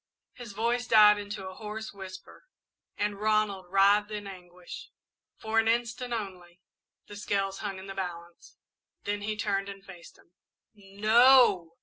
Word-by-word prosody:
His 240 -4 -10
voice 235 +3 -1
died 210 -2 +7
into 205 -1 -7
a 185 - -8
hoarse 215 +2 -7
whisper 190 - -11 0.5
and 205 -1 -2
Ronald 215 -3 0
writhed 200 +2 +4
in 210 -1 -6
anguish. 180 -2 -11 0.5
For 220 0 0
an 225 - +1
instant, 240 +2 -1
only, 185 -6 -6 0.5
the 205 - -11
scales 195 -1 -2
hung 200 -2 -5
in 190 - -10
the 195 - -7
balance, 175 -3 -8 0.5
then 205 0 -3
he 215 +1 -3
turned 200 -2 -1
and 195 0 -10
faced 180 -3 -13
him. - - -25 0.4
"No!" 210 -2 +4
205 Hz, 145 wpm, -28 LUFS, 190-215 Hz, 0.5 s, died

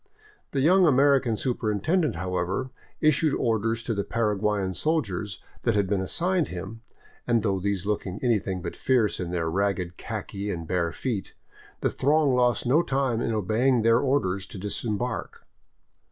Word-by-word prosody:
The 135 - -1
young 180 +5 +5
American 135 -4 +4
superintendent, 125 - 0
however, 90 +8 -2 0.3
issued 155 0 +3
orders 115 0 0
to 115 - -1
the 100 -1 -1
Paraguayan 105 -4 0
soldiers 105 - -1 0.2
that 115 -3 +1
had 100 -1 +2
been 95 0 0
assigned 175 - +1
him, 100 +5 -7 0.5
and 115 -2 +2
though 100 -3 +1
these 100 0 -2
looked 105 -1 -1
anything 95 -2 -1
but 85 - -5
fierce 120 -6 +1
in 90 -2 -3
their 85 -2 -1
ragged 90 0 -1
khaki 100 +1 -5
and 85 -4 -4
bare 85 -1 0
feet, 115 -3 -4 0.5
the - - +1
throng 145 0 +2
lost 125 -2 +2
no 140 +7 +4
time 135 -6 0
in 115 - -1
obeying 110 +4 +2
their 115 +1 +5
orders 100 -9 0
to - - -9
disembark. 105 +4 -3
110 Hz, 155 wpm, -26 LUFS, 95-130 Hz, 0.5 s, young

